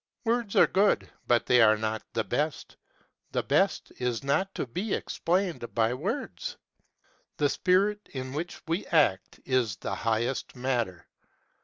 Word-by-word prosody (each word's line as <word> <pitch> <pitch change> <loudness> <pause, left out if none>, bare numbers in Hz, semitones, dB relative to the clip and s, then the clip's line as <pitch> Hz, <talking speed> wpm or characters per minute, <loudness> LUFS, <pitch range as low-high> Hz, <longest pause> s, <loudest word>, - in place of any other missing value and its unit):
Words 230 -2 0
are - - +8
good, 200 +1 +2 0.2
but 120 -1 +3
they 125 -1 +5
are 110 -1 +6
not 110 0 -2
the 115 - 0
best. 145 +10 -2 0.6
The - - 0
best - - +1
is 125 0 -1
not 165 +8 +1
to - - -2
be 180 - -2
explained 175 -7 -1
by 115 0 +2
words. 180 - -4 0.8
The 145 -1 +2
spirit 200 +6 +1
in 130 -1 -5
which 165 +5 -5
we 165 +4 -1
act 100 - +2
is 125 -7 +1
the 100 - -5
highest 115 +6 -1
matter. 120 -8 -2
130 Hz, 145 wpm, -28 LUFS, 115-180 Hz, 0.8 s, are